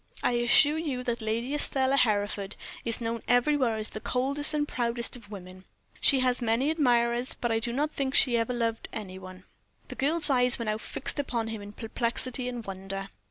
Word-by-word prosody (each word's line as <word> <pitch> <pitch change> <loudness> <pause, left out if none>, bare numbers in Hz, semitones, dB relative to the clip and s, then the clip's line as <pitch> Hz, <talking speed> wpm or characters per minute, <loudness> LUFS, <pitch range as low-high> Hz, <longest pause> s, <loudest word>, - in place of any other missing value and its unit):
I - - +2
assure 245 +6 +4
you 275 -6 -3
that 240 -2 -3
Lady 230 +5 -2
Estelle 270 -2 +6
Hereford 205 -4 0 0.3
is 230 0 +3
known 230 0 -3
everywhere 245 -1 +2
as 215 0 -5
the - - -6
coldest 275 +6 0
and 295 -1 -1
proudest 235 -2 -2
of 230 -4 -13
women. 185 -2 -11 0.3
She 270 -3 +4
has 250 -1 +1
had 240 - -4
many 250 +7 +1
admirers, 245 -5 +1
but 240 - -3
I 225 - +1
do 235 +1 -4
not 295 +5 -1
think 270 -2 -3
she 245 -3 +4
ever 230 +1 0
loved 230 -2 -3
any 190 -4 -7
one." 185 0 -12 0.5
The - - -7
girl's 300 +2 +2
eyes 250 -1 +4
were 235 - -5
now 215 0 -2
fixed 275 +5 -1
on 230 -2 -2
him 220 -2 -6
in 205 0 -10
perplexity 245 +3 -3
and 240 -3 -7
wonder. 195 0 -6
240 Hz, 200 wpm, -27 LUFS, 220-260 Hz, 0.5 s, Estelle